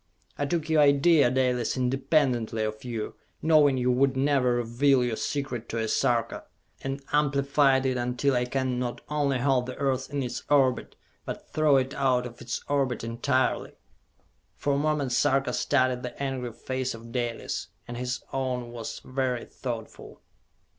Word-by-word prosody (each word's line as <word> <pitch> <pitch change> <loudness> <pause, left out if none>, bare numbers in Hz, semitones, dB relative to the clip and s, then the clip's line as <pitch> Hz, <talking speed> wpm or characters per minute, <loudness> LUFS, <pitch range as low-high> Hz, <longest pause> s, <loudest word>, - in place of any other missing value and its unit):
I 145 - -2
took 165 0 -1
your 160 -1 +4
idea, 145 0 +5
Dalis, 125 -1 0
independently 125 -3 +1
of 110 0 -4
you, 115 -4 -4 0.3
knowing 150 -4 +4
you 125 0 +2
would 130 +1 +2
never 135 -3 +2
reveal 125 +3 +2
your 120 -2 -1
secret 125 -3 -3
to 115 - -3
a 110 -1 -1
Sarka, 115 +1 0 0.4
and 135 +1 -4
amplified 140 -2 +3
it 130 -1 +1
until 125 +3 0
I 125 -1 +1
can 130 -1 -1
not 125 -1 -3
only 145 -3 +1
halt 125 -1 +1
the 130 - -5
Earth 135 -1 -1
in 140 -1 -1
its 125 - -4
orbit, 135 -4 +2 0.3
but - - -7
throw 155 -3 +4
it 130 +1 0
out 130 -2 +1
of 120 -1 -9
its 120 - -4
orbit 135 -5 0
entirely!" 130 +3 0 0.8
For 145 - 0
a - - +1
moment 150 -3 0
Sarka 135 +2 +2
studied 130 -3 +1
the 125 - -7
angry 130 -3 -3
face 130 0 -3
of 115 +1 -11
Dalis, 120 -1 -3 0.2
and 120 - -6
his 125 +1 -3
own 125 -3 -2
was 115 -2 -6
very 130 -2 -1
thoughtful. 115 -4 -7
130 Hz, 160 wpm, -27 LUFS, 125-140 Hz, 0.8 s, idea